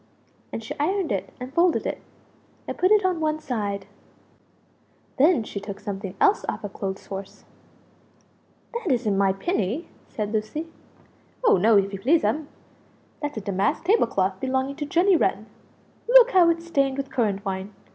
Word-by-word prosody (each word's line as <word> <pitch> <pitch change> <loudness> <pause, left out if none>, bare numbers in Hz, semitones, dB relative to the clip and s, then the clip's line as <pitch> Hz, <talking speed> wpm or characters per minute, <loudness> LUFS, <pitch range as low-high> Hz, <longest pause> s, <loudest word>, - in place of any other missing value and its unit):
And 225 - -5
she 220 - -5
ironed 365 - 0
it 195 - -2
and 255 +2 -7
folded 340 +1 +2
it, - - -3 0.7
and - - -4
put 370 - +2
it 420 -2 +4
on 365 -3 +1
one 310 -1 0
side. 205 -9 -3 1.3
Then 300 -3 +5
she 205 - -6
took 200 0 -7
something 195 -2 -6
else 420 0 +4
off 220 - -4
a 205 - -4
clothes 195 0 -5
horse 195 0 -8 1.3
"That 465 -9 -2
isn't 230 -5 +1
my 195 0 +3
pinny?" 235 - -2 0.2
said 210 -1 -4
Lucie. 215 +9 -2 0.8
"Oh 455 - +5
no, 215 +3 +5
if 200 0 +1
you 195 - -4
please'm; 305 - +2 0.7
that's 290 -4 -4
a - - -3
damask 200 +8 0
table 400 - +3
cloth 190 -3 -1
belonging 265 +2 -1
to 295 -2 -4
Jenny 355 +6 +4
Wren; - - +1 0.6
look - - +8
how 355 -3 +6
it's 335 0 -1
stained 275 -5 +1
with 275 0 -4
currant 205 -6 -1
wine! 190 +1 -4
260 Hz, 165 wpm, -24 LUFS, 200-335 Hz, 1.3 s, look